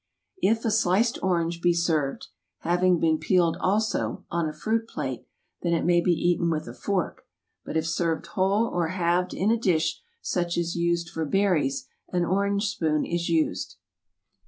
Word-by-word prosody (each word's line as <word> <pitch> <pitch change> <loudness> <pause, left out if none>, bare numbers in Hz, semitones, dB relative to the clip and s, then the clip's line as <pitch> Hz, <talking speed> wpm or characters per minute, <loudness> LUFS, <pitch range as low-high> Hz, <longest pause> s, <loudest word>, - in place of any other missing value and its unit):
If 225 +4 +2
a 225 - +2
sliced 215 +2 +2
orange 170 -2 0
be 175 -1 +4
served 160 -5 0 0.3
(having 175 +1 +2
been 160 -1 +2
peeled 170 +1 +2
also) 205 -1 0
on 170 -2 0
a - - -4
fruit 225 +8 -1
plate, - - -5 0.3
then 170 -1 0
it 165 - 0
may 175 0 +4
be 175 - 0
eaten 170 0 +1
with 155 -4 -2
a 120 - -7
fork, 190 +6 -3 0.4
but 160 - -3
if 160 - 0
served 165 0 -1
whole 200 +2 +1
or 175 -6 -1
halved 180 +1 0
in 205 +4 +1
a 230 - +3
dish 165 -6 +1 0.2
such 175 -1 -1
as 170 0 -1
used 170 0 0
for 160 - -3
berries, 160 -5 +1 0.2
an 175 -1 0
orange 200 +3 +1
spoon 155 -6 0
is 170 0 -2
used. 160 -2 0
175 Hz, 170 wpm, -26 LUFS, 165-190 Hz, 0.4 s, be